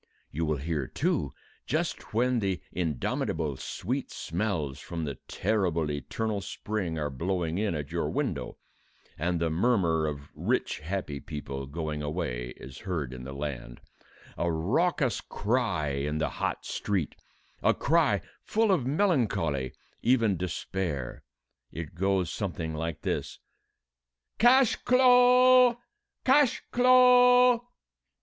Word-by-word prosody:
You 80 Hz, +3 st, -2 dB
will 75 Hz, -1 st, 0 dB
hear, 75 Hz, -2 st, -2 dB
too, -, -, -1 dB, 0.4 s
just -, -, -2 dB
when 125 Hz, +2 st, +2 dB
the 95 Hz, -3 st, -1 dB
indomitable 80 Hz, -2 st, -2 dB
sweet -, -, -4 dB
smells 85 Hz, -7 st, -3 dB
from 85 Hz, -2 st, -5 dB
the 70 Hz, -4 st, -5 dB
terrible 90 Hz, -7 st, 0 dB
eternal 105 Hz, +8 st, -3 dB
spring 95 Hz, -4 st, -4 dB
are 75 Hz, -2 st, -2 dB
blowing 85 Hz, +4 st, -2 dB
in 105 Hz, -5 st, 0 dB
at 75 Hz, 0 st, -5 dB
your 85 Hz, 0 st, -1 dB
window, -, -, -3 dB, 0.6 s
and 85 Hz, +2 st, -1 dB
the 85 Hz, -1 st, 0 dB
murmur 85 Hz, -5 st, +2 dB
of 70 Hz, -1 st, -6 dB
rich -, -, -1 dB
happy 80 Hz, -3 st, -4 dB
people 70 Hz, -2 st, -6 dB
going 75 Hz, 0 st, -4 dB
away 75 Hz, -6 st, -3 dB
is 65 Hz, 0 st, -10 dB
heard 80 Hz, -10 st, -3 dB
in 60 Hz, 0 st, -8 dB
the 65 Hz, -, -6 dB
land, 70 Hz, -4 st, -6 dB, 0.6 s
a 85 Hz, 0 st, +1 dB
raucous 130 Hz, -, +1 dB
cry 105 Hz, -, -1 dB
in 70 Hz, +2 st, -2 dB
the 80 Hz, -, 0 dB
hot -, -, -3 dB
street 95 Hz, -7 st, -2 dB, 0.5 s
a -, -, +4 dB
cry -, -, +2 dB, 0.2 s
full 220 Hz, -1 st, +2 dB
of 150 Hz, -10 st, +1 dB
melancholy, 105 Hz, -, +1 dB, 0.3 s
even 115 Hz, -5 st, +3 dB
despair: 90 Hz, -5 st, -4 dB, 0.5 s
it 80 Hz, -2 st, -7 dB
goes 95 Hz, 0 st, 0 dB
something 85 Hz, -6 st, -3 dB
like 80 Hz, 0 st, -4 dB
this -, -, -2 dB, 1.0 s
"Cash 245 Hz, +1 st, +5 dB
clo'! 250 Hz, -1 st, +6 dB, 0.5 s
Cash 270 Hz, -1 st, +4 dB
clo'!" 250 Hz, -1 st, +6 dB
85 Hz, 125 wpm, -28 LUFS, 75-120 Hz, 1.0 s, clo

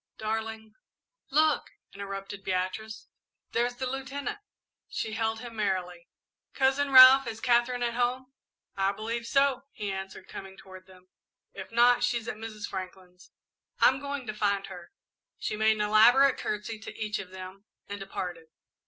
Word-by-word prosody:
"Darling 220 Hz, 0 st, -4 dB, 0.3 s
" -, -, -53 dB
"Look," 310 Hz, -2 st, +2 dB, 0.2 s
interrupted 195 Hz, 0 st, -7 dB
Beatrice, 190 Hz, +4 st, -3 dB, 0.4 s
"there's 240 Hz, +1 st, 0 dB
the 260 Hz, -, -4 dB
Lieutenant." 270 Hz, +7 st, -4 dB, 0.5 s
She 220 Hz, -, -4 dB
hailed 225 Hz, 0 st, -1 dB
him 240 Hz, -2 st, -9 dB
merrily. 185 Hz, -4 st, -2 dB, 0.5 s
"Cousin 275 Hz, +1 st, +2 dB
Ralph, 260 Hz, 0 st, +9 dB
is 225 Hz, -1 st, -5 dB
Katherine 245 Hz, 0 st, +2 dB
at 235 Hz, -1 st, -1 dB
home?" 250 Hz, +2 st, -1 dB, 0.4 s
"I 195 Hz, 0 st, +1 dB
believe 230 Hz, +3 st, -4 dB
so," 275 Hz, -1 st, +2 dB
he 205 Hz, -1 st, -4 dB
answered, 190 Hz, 0 st, -7 dB
coming 195 Hz, 0 st, -9 dB
toward 185 Hz, 0 st, -13 dB
them; 185 Hz, -1 st, -19 dB, 0.4 s
"if -, -, -9 dB
not, 240 Hz, +1 st, +4 dB
she's 235 Hz, -2 st, 0 dB
at 215 Hz, -, -4 dB
Mrs. 215 Hz, -1 st, -7 dB
Franklin's." 185 Hz, -1 st, -9 dB, 0.5 s
"I'm 260 Hz, -, +5 dB
going 280 Hz, -2 st, -5 dB
to 215 Hz, -, -4 dB
find 200 Hz, -2 st, 0 dB
her." 180 Hz, -3 st, -11 dB, 0.5 s
She -, -, -3 dB
made 220 Hz, +1 st, +3 dB
an 215 Hz, -, -3 dB
elaborate 235 Hz, +6 st, +5 dB
courtesy 215 Hz, +1 st, -4 dB
to 220 Hz, -, -10 dB
each 215 Hz, -1 st, -2 dB
of 185 Hz, -, -7 dB
them, 190 Hz, +2 st, -10 dB, 0.2 s
and 200 Hz, 0 st, -6 dB
departed. 180 Hz, -4 st, -6 dB
220 Hz, 155 wpm, -28 LUFS, 195-245 Hz, 0.5 s, Ralph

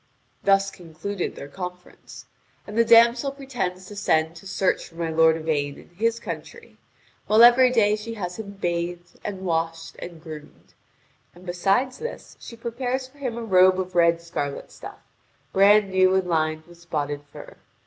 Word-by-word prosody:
Thus 195 Hz, 0 st, +3 dB
concluded 180 Hz, +2 st, -5 dB
their 140 Hz, -, -8 dB
conference. 180 Hz, +3 st, -9 dB, 0.4 s
And 210 Hz, -, -9 dB
the 230 Hz, -, +5 dB
damsel 235 Hz, +4 st, +5 dB
pretends 245 Hz, -10 st, -4 dB
to 205 Hz, -, -10 dB
send 160 Hz, -4 st, +1 dB
to 195 Hz, -, -12 dB
search 190 Hz, 0 st, 0 dB
for 165 Hz, -, -20 dB
my 165 Hz, -1 st, -2 dB
lord 160 Hz, 0 st, +4 dB
Yvain 145 Hz, -3 st, -2 dB
in -, -, -16 dB
his 230 Hz, +6 st, -1 dB
country; 470 Hz, -, -9 dB, 0.5 s
while 215 Hz, +2 st, +6 dB
every 245 Hz, +2 st, +7 dB
day 215 Hz, -4 st, +3 dB
she 225 Hz, +2 st, -7 dB
has 180 Hz, -2 st, -5 dB
him 200 Hz, -2 st, -7 dB
bathed, 175 Hz, -2 st, -4 dB
and 195 Hz, -2 st, -5 dB
washed, 165 Hz, -1 st, -2 dB
and 170 Hz, -2 st, -8 dB
groomed. 155 Hz, -2 st, -12 dB, 0.6 s
And 180 Hz, +1 st, -15 dB
besides 195 Hz, +9 st, 0 dB
this 475 Hz, -, -7 dB
she 235 Hz, -, -10 dB
prepares 245 Hz, +3 st, -3 dB
for 280 Hz, +2 st, -23 dB
him 250 Hz, -4 st, -3 dB
a 235 Hz, -, -4 dB
robe 185 Hz, -3 st, +5 dB
of 185 Hz, 0 st, -4 dB
red 170 Hz, -1 st, +4 dB
scarlet 145 Hz, -4 st, -5 dB
stuff, -, -, -10 dB, 0.6 s
brand 200 Hz, +1 st, +5 dB
new 185 Hz, 0 st, +4 dB
and 190 Hz, -1 st, +1 dB
lined 155 Hz, -2 st, 0 dB
with 175 Hz, 0 st, -17 dB
spotted 145 Hz, -4 st, -3 dB
fur. -, -, -12 dB
185 Hz, 170 wpm, -24 LUFS, 170-230 Hz, 0.6 s, every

